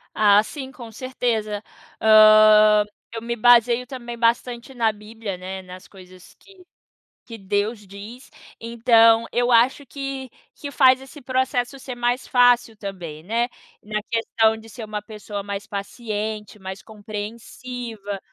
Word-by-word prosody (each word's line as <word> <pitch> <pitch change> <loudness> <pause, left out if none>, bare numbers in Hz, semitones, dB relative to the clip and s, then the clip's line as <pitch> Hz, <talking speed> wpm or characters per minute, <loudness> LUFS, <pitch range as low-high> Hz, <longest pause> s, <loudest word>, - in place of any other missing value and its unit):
Ah, 205 -1 +5
sim, 265 +1 -8
com 240 -3 -11
certeza. 220 -4 -3 0.4
Hã, 215 -1 +7 0.3
eu 225 - -5
me 235 +1 -3
baseio 240 +1 +4
também 240 -2 -8
bastante 235 +2 -1
na 230 -3 +1
Bíblia, 210 -2 -8
né, 190 +1 -7
nas 185 0 -12
coisas 185 -2 -16
que 380 -2 -19 0.6
que 230 -2 -9
Deus 205 +1 -2
diz. 210 +6 -11 0.3
Então, 230 0 +4
eu 245 0 +1
acho 245 +4 +3
que 275 0 -6 0.3
que 285 - -7
faz 260 -3 +5
esse 275 +2 -13
processo 260 0 -1
ser 255 -1 -7
mais 245 +1 -1
fácil 245 -2 +3
também, 180 -7 -8
né. 230 +6 0 0.3
Na 210 0 -4
questão 225 -1 +1
de 220 0 -14
ser 225 +2 -9
uma 210 -1 -5
pessoa 210 -1 -7
mais 200 0 -6
paciente, 210 0 -5
mais 190 0 -8
compreensiva. 215 0 -7
225 Hz, 135 wpm, -22 LUFS, 210-245 Hz, 0.6 s, Hã